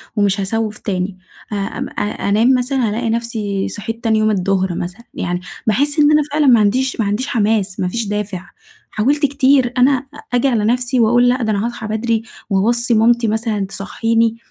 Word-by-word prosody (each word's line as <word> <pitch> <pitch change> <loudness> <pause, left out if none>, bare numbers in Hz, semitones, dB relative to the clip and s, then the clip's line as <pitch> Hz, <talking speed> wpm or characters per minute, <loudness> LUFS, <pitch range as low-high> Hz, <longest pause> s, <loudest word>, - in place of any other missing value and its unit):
ومش 200 -1 +1
هاسوّف 215 +2 -2
تاني، 185 -1 -3 0.4
آآ - - -1
أم 195 - -4
أ - - -5 0.3
أنام 230 +6 +4
مثلًا، 250 -2 0
ألاقي 230 +2 -2
نفسي 220 -4 -2
صحيت 225 +2 -6
تاني 220 -1 +2
يوم 215 0 +2
الظهر 190 -2 0
مثلًا، 180 +8 -6
يعني 180 0 -3 0.3
باحس 285 +8 +1
إن 295 0 +5
أنا 300 0 +5
فعلًا 295 -1 +2
ما 240 -4 +6
عنديش 250 +5 +1
ما 215 - +1
عنديش 210 +7 -1
حماس، 205 -4 0
ما 180 - 0
فيش 225 +4 -2
دافع، 205 -3 -4 0.4
حاولت 285 +7 +1
كتير 265 -2 +2
أنا 265 +1 +3 0.3
آجي 245 +2 +3
على 225 -5 +1
نفسي، 245 +2 +1
وأقول 240 +2 +4
لأ، 250 -1 0
ده 220 - 0
أنا 205 +2 0
هاصحى 235 -2 -5
بدري، 225 +1 -1 0.3
وأوصّي 235 +5 +1
مامتي 230 +1 +3
مثلًا 215 -2 -1
تصحيني، 225 +3 -1
225 Hz, 180 wpm, -18 LUFS, 205-245 Hz, 0.4 s, ما